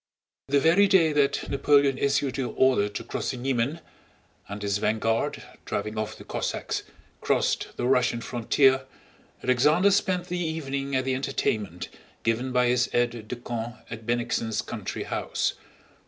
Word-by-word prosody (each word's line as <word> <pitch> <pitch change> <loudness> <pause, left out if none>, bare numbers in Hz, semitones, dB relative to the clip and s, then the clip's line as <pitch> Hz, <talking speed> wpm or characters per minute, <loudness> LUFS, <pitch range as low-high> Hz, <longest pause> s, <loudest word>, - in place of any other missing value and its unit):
The 140 +1 +3
very 170 +7 +5
day 170 -5 +4
that 140 -1 +1
Napoleon 140 -1 +3
issued 140 -1 +1
the 135 - -1
order 125 -6 +2
to 105 - -6
cross - - -3
the 130 - -3
Niemen, 135 +5 -1 0.7
and 100 +1 -5
his 100 0 0
vanguard, 110 +1 0 0.2
driving 105 +1 -3
off 110 0 -3
the - - -11
Cossacks, - - -3 0.4
crossed - - 0
the - - -1
Russian 125 -2 +2
frontier, 130 +3 +2 0.6
Alexander 150 +10 +4
spent 185 -3 +1
the 180 0 -3
evening 140 -4 -3
at 130 0 +1
the 130 - 0
entertainment 110 -9 -2 0.4
given 115 +3 0
by 125 0 +3
his 125 0 +2
aides 120 -2 0
de 125 - -4
camp 120 -1 -5 0.2
at 115 -1 -8
Bennigsen's 120 -2 -1
country - - -5
house. - - -1
130 Hz, 150 wpm, -26 LUFS, 115-140 Hz, 0.7 s, very